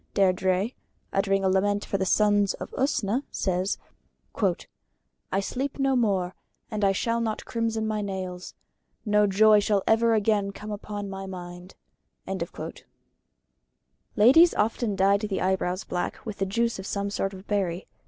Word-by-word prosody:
Deirdrĕ, 190 +3 +2 0.4
uttering 195 0 +1
a - - +3
lament 200 +2 +1
for 195 - -2
the 190 - 0
sons 205 0 +3
of - - -8
Usna, 250 -3 0
says: 185 +1 -1 1.5
"I 195 - +1
sleep 260 +7 -3
no 270 -1 +2
more, 195 -7 +1 0.4
and 215 -1 -2
I 195 - +5
shall 230 +4 0
not 220 -2 -2
crimson 225 -1 -1
my 215 -1 -1
nails; 185 -2 -5 0.5
no 210 -1 +4
joy 210 +2 +6
shall 205 -1 +1
ever 225 0 +4
again 205 -2 +1
come 210 +1 -8
upon 205 0 -5
my 195 0 -6
mind." 180 0 -9 2.4
Ladies 270 +11 +6
often 220 0 0
dyed 200 +1 +3
the 210 -3 -2
eyebrows 185 0 0
black 180 - -4
with 215 -3 -5
the 195 - 0
juice 230 +2 0
of 190 - -6
some 200 0 -2
sort 195 -1 -2
of 190 +1 -12
berry. 190 -3 -1
200 Hz, 145 wpm, -26 LUFS, 190-220 Hz, 2.4 s, joy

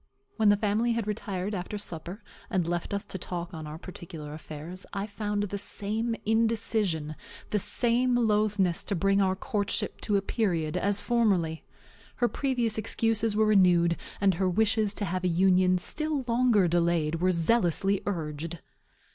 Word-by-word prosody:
When 220 -2 +4
the 205 - +5
family 220 +3 +1
had 230 -2 -1
retired 205 -2 -3
after 190 +2 -4
supper, 180 +1 -6 0.3
and 185 -7 0
left 175 0 -2
us 200 0 -2
to 190 - -6
talk 175 +1 -5
on 160 -2 -6
our 150 +1 -7
particular 165 -4 -8
affairs, 155 +4 -8
I 200 0 -2
found 205 0 -2
the 200 0 -3
same 220 +4 -2
indecision, 215 -8 0 0.4
the 210 - +2
same 245 +4 +1
loathness 210 -5 +2
to 200 - -1
bring 195 +3 +2
our 190 -1 +2
courtship 205 0 -2
to 205 -2 +1
a 195 - -1
period, 170 -9 0
as 205 +1 +1
formerly. 195 -10 +1 0.5
Her 240 - +2
previous 240 -5 -1
excuses 225 0 0
were 220 +1 +4
renewed, 180 -5 +4 0.2
and 195 -1 +4
her 185 - +3
wishes 215 +1 +1
to 205 - -1
have 185 0 -2
a - - +2
union 185 +1 +4
still 300 - -2
longer 230 -5 +3
delayed 170 -1 +1
were 185 - +3
zealously 195 +1 +2
urged. 165 -2 -3
200 Hz, 160 wpm, -28 LUFS, 175-220 Hz, 0.5 s, the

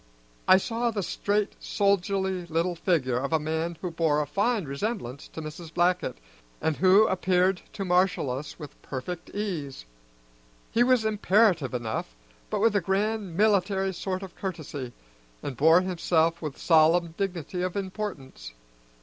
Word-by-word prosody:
I 185 - +8
saw 230 +4 -1
the 210 -4 -2
straight, 205 +3 -1
soldierly 190 -2 0
little 165 +2 0
figure 160 -8 0
of 140 +3 -3
a 160 - +3
man 160 +2 -2
who 180 - -3
bore 160 -2 +1
a 150 - 0
fine 200 - 0
resemblance 140 - -4
to 160 - -8
Mrs. 155 +2 -8
Blackett, 175 - +1 0.4
and 160 - 0
who 190 +4 +6
appeared 185 -1 +2
to 195 - -4
marshal 180 -6 +2
us 135 +4 -6
with 150 -3 -11
perfect 160 +6 -6
ease. 165 - -4 0.9
He 235 - +2
was 250 -3 +3
imperative 205 - +2
enough, 110 - -4 0.3
but - - -1
with 225 -1 +3
a 205 - +3
grand 195 -1 -1
military 195 -2 +2
sort 185 +1 -3
of 185 -2 -9
courtesy, 155 -9 -5 0.5
and 135 - -4
bore 160 +7 +6
himself 170 -2 +1
with 150 -4 -5
solemn 165 +1 +4
dignity 180 -2 -3
of 185 +1 -2
importance. 185 - -5
180 Hz, 150 wpm, -27 LUFS, 155-195 Hz, 0.9 s, I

